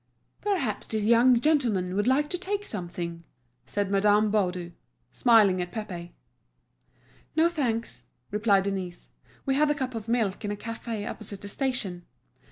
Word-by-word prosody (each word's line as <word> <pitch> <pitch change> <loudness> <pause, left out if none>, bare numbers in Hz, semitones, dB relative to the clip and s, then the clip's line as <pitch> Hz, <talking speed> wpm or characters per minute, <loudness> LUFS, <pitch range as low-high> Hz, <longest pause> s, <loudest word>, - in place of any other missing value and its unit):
"Perhaps 330 - -1
this 215 -1 -1
young 235 +2 +5
gentleman 235 -11 +2
would 205 +3 +1
like 280 +3 +3
to 360 - -1
take 405 +2 -2
something?" 170 - -5 0.4
said 200 -1 -1
Madame 205 +1 +4
Baudu, 180 -4 0 0.4
smiling 215 -7 +5
at 180 0 -4
Pépé. 175 -5 -6 1.2
"No, 320 +1 +5
thanks," 230 - -2 0.2
replied 205 -2 +3
Denise, 190 -3 -4 0.4
"we 270 - +2
had 295 +2 +3
a 295 - +2
cup 260 -3 -3
of 225 -1 -5
milk 225 -5 0
in 205 - -2
a 205 - -1
café 225 -1 -5
opposite 200 -2 -7
the 205 - -7
station." 205 -7 -2
215 Hz, 150 wpm, -27 LUFS, 190-255 Hz, 1.2 s, young